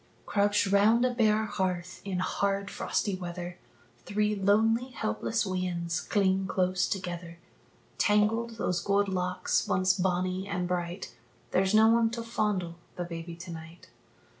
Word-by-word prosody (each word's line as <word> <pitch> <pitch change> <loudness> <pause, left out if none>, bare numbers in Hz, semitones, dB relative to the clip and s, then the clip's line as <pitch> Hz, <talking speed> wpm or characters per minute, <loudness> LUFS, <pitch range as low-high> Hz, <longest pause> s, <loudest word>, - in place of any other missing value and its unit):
Crouched 205 0 +2
round 210 +5 +4
a 255 - +2
bare 220 -2 +2
hearth 185 -3 -3
in 195 -2 -3
hard, 200 +2 -1
frosty 205 - -1
weather, 175 -1 -6 0.4
Three 210 +1 0
lonely 220 +4 +3
helpless 230 -1 -1
weans 180 -2 -2
cling 190 -2 +1
close 185 0 +1
together; 175 -3 -4 0.6
Tangled 225 +2 +2
those 180 -5 0
gold 200 0 +2
locks, 180 -1 0
once 185 0 +3
bonnie 185 0 -1
and 180 -3 -2
bright 175 -4 -3 0.4
There's 190 +2 +2
no 220 +1 +7
one 230 0 +4
to 230 - -3
fondle 205 -7 -1 0.2
the 175 - -3
baby 170 0 -6
to 175 +1 -9
night. 160 +1 -10
190 Hz, 140 wpm, -29 LUFS, 180-210 Hz, 0.6 s, no